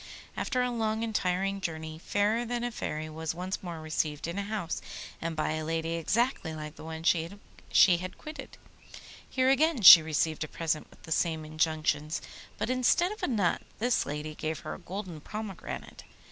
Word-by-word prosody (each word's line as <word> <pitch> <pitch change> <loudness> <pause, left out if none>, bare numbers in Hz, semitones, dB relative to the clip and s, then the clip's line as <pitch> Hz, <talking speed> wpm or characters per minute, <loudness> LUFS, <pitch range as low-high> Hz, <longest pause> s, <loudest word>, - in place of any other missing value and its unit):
After 255 -2 0
a 250 - 0
long 220 -1 -1
and 225 -1 -3
tiring 195 +1 0
journey 160 -2 -4
Fairer 205 +6 +1
than 240 0 -2
a 245 - -1
Fairy 155 -7 -4
was 160 +1 -4
once 185 +2 -4
more 170 -3 -6
received 155 -1 -2
in 170 +4 -3
a - - 0
house, 200 -5 -3 0.4
and 165 0 -2
by 155 0 0
a 155 0 -2
lady 165 +1 -2
exactly 170 - 0
like 150 -1 -6
the - - -11
one 160 0 -6
she 165 -1 +2 0.7
had 185 +1 -7
quitted. 295 -4 -9 0.7
Here 260 0 +3
again 285 -3 +2
she 175 -2 +13
received 155 0 0
a - - -5
present 155 0 -2
with - - -21
the 160 - -10
same 160 -1 0
injunctions, 155 -1 0 0.4
but - - -1
instead 255 +9 +3
of 425 - -8
a - - 0
nut 205 -8 +1 0.2
this 245 +2 +1
lady 150 +2 -4
gave 155 0 -4
her - - -5
a - - -8
golden 180 -3 -6
pomegranate. 210 +1 -7
170 Hz, 185 wpm, -29 LUFS, 155-220 Hz, 0.7 s, she